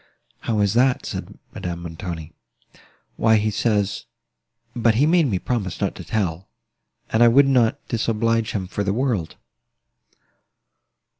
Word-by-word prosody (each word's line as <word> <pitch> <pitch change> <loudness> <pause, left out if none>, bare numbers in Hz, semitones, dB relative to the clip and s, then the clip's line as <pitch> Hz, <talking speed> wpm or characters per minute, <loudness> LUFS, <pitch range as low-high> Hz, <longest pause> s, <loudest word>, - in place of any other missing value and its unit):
"How 110 -3 -1
is 100 0 +2
that?" 125 +2 +2
said - - -6 0.2
Madame 85 -1 -5
Montoni. 80 -1 -6 0.9
"Why 110 0 +4
he 110 0 +1
says—but 105 +2 -2
he 135 +6 +4
made 165 -1 +4
me 100 -7 0
promise 100 -3 -3
not - - -1
to - - -9
tell, 95 -4 -2 0.6
and 110 - +2
I 120 - +8
would 135 +4 +6
not 125 -4 +3
disoblige 115 0 0
him 95 -3 -2
for 100 +2 -3
the 100 0 0
world." 115 -11 -1
110 Hz, 135 wpm, -22 LUFS, 95-120 Hz, 0.9 s, I